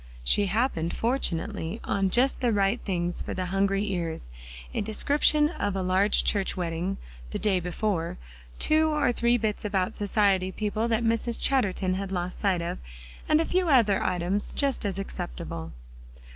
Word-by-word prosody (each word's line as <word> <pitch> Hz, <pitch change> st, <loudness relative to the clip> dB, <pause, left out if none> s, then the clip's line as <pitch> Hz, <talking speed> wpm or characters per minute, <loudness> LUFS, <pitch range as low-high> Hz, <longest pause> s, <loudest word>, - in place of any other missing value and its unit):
She 200 Hz, -, +3 dB
happened 195 Hz, -5 st, 0 dB
fortunately 220 Hz, -5 st, -1 dB
on 195 Hz, -1 st, 0 dB
just 250 Hz, +7 st, +2 dB
the 245 Hz, -2 st, +1 dB
right 200 Hz, +2 st, +1 dB
things 175 Hz, -3 st, -2 dB
for -, -, -4 dB
the 185 Hz, -, -2 dB
hungry 195 Hz, +2 st, +1 dB
ears; 165 Hz, -, -4 dB, 0.4 s
a -, -, -1 dB
description 290 Hz, +7 st, +2 dB
of 205 Hz, -, -2 dB
a 190 Hz, -, -1 dB
large 185 Hz, +3 st, +3 dB
church 200 Hz, -2 st, 0 dB
wedding, 175 Hz, +2 st, -2 dB, 0.3 s
the -, -, -3 dB
day 195 Hz, -3 st, +4 dB
before; 180 Hz, -1 st, -2 dB, 0.4 s
two 315 Hz, +1 st, +3 dB
or 300 Hz, -4 st, +2 dB
three 240 Hz, 0 st, +2 dB
bits 215 Hz, -2 st, -2 dB
about 200 Hz, -1 st, 0 dB
society 200 Hz, -2 st, +1 dB
people 215 Hz, +3 st, -1 dB
that 230 Hz, 0 st, +1 dB
Mrs. 230 Hz, +1 st, 0 dB
Chatterton 195 Hz, -8 st, +1 dB
had 195 Hz, +1 st, -3 dB
lost 180 Hz, -1 st, -3 dB
sight 185 Hz, -4 st, +1 dB
of, 170 Hz, -, -4 dB, 0.5 s
and 310 Hz, -, +5 dB
a 325 Hz, -, +1 dB
few 360 Hz, 0 st, +1 dB
other 225 Hz, -8 st, +4 dB
items 185 Hz, +3 st, -1 dB
just 275 Hz, -6 st, 0 dB
as 195 Hz, -1 st, -3 dB
acceptable. 80 Hz, -, -5 dB
200 Hz, 160 wpm, -27 LUFS, 185-230 Hz, 0.5 s, and